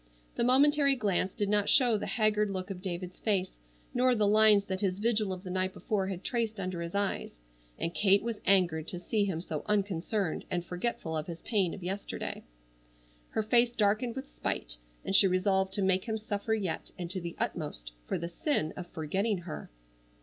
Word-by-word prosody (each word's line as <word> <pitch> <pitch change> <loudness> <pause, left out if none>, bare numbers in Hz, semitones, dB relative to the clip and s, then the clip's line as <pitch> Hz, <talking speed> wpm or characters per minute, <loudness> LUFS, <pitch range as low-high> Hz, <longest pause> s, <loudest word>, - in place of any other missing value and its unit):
The - - 0
momentary 280 +3 +5
glance 195 -5 0
did 205 0 -1
not 205 0 +2
show 245 -4 +5
the 210 - -2
haggard 210 0 +2
look 190 0 -4
of 180 -2 -6
David's 180 -1 -5
face 190 - 0 0.3
nor 250 0 +3
the 215 -2 +2
lines 210 -1 +6
that 190 -1 -3
his 190 -2 0
vigil 215 -2 +1
of 185 0 -5
the 185 - -6
night 185 0 -1
before 195 -3 -1
had 190 -1 -5
traced 225 -4 -1
under 185 -2 -3
his 170 +2 -5
eyes, 200 - -1 0.4
and 165 - -2
Kate 200 +1 +4
was 230 -2 -3
angered 175 -5 +3
to 180 - -5
see 205 +3 0
him 175 -5 -2
so 155 -4 -4
unconcerned 200 -2 0
and 175 -2 -2
forgetful 180 -3 -3
of 155 -1 -3
his 170 -1 -7
pain 195 -7 +1
of 190 - -10
yesterday. 195 +3 -4 0.9
Her 220 - -1
face 235 +2 +3
darkened 220 +3 +1
with 265 +1 -7
spite, - - -3 0.3
and 195 - +1
she 195 - +8
resolved 190 +1 +2
to 200 - 0
make 190 -1 +2
him 220 -2 -1
suffer 215 0 -1
yet, 195 -6 -3
and 175 - -4
to 185 -1 -3
the 170 0 -6
utmost, - - -3 0.2
for - - -1
the 170 - -4
sin 170 - -1
of 180 -2 -6
forgetting 190 +7 -1
her. 170 -3 -7
195 Hz, 195 wpm, -30 LUFS, 180-215 Hz, 0.9 s, she